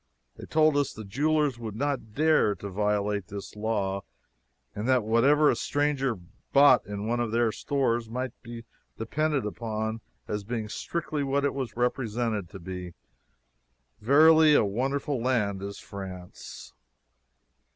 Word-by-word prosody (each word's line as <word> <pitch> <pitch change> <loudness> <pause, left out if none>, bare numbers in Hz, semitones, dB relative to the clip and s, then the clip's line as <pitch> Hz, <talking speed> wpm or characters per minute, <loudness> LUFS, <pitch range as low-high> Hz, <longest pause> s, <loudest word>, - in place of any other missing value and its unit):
They - - -10
told 155 -2 +3
us 145 -2 +1
the 110 - -8
jewelers 145 +4 0
would 110 -3 -6
not 135 -4 -3
dare 155 -9 +3
to 100 +2 -7
violate 105 -1 0
this 100 +1 -8
law, 105 -3 -1 0.7
and 105 +3 -4
that 130 -3 +3
whatever 135 +8 +4
a - - 0
stranger 145 -4 0 0.4
bought 140 -4 +6
in 105 0 -5
one 120 +1 0
of 120 -2 -1
their 115 0 +2
stores 120 -4 -1
might 125 +2 -3
be 115 -1 -9 0.3
depended 145 +3 -1
upon 110 +1 -3 0.3
as 105 -1 -3
being 110 0 -4
strictly 155 +3 -3
what 140 +1 0
it 140 - 0
was 130 -5 -5
represented 115 -5 -1
to 95 - -9
be. 90 -1 -7 1.0
Verily, 155 +5 +6
a 110 - +4
wonderful 135 +5 -1
land 105 -6 0
is 100 0 -6
France! 95 -2 -9
115 Hz, 140 wpm, -27 LUFS, 105-140 Hz, 1.0 s, bought